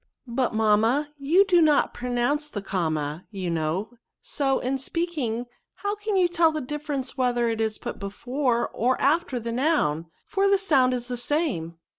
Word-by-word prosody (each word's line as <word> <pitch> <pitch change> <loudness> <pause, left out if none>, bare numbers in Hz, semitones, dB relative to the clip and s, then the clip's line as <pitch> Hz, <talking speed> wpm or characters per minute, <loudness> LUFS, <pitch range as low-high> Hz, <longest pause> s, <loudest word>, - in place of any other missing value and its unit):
" - - -45
But, 240 -1 -1
mamma, 225 +7 +2
you 335 +8 +4
do 355 -3 +4
not 300 -2 +3
pronounce 250 +5 -1
the 205 -7 -5
comma, 155 -4 -2
you 190 -4 -4
know; 165 +7 -1 0.3
so, 270 -2 0
in 265 +2 -2
speaking, 270 -6 -2 0.3
how 405 0 -2
can 420 0 -3
you 365 -2 +4
tell 340 -2 +3
the 310 - -3
difference 285 -1 -4
whether 240 -2 +2
it 225 -1 -1
is 220 -1 -1
put - - -6
before 240 +5 -1
or 250 +3 0
after 280 -3 +1
the 230 0 -4
noun, 230 - +1 0.2
for 395 0 +1
the 395 - +5
sound 270 -10 +3
is 245 -1 -5
the 250 -1 -3
same 240 - -1
255 Hz, 175 wpm, -25 LUFS, 220-300 Hz, 0.3 s, the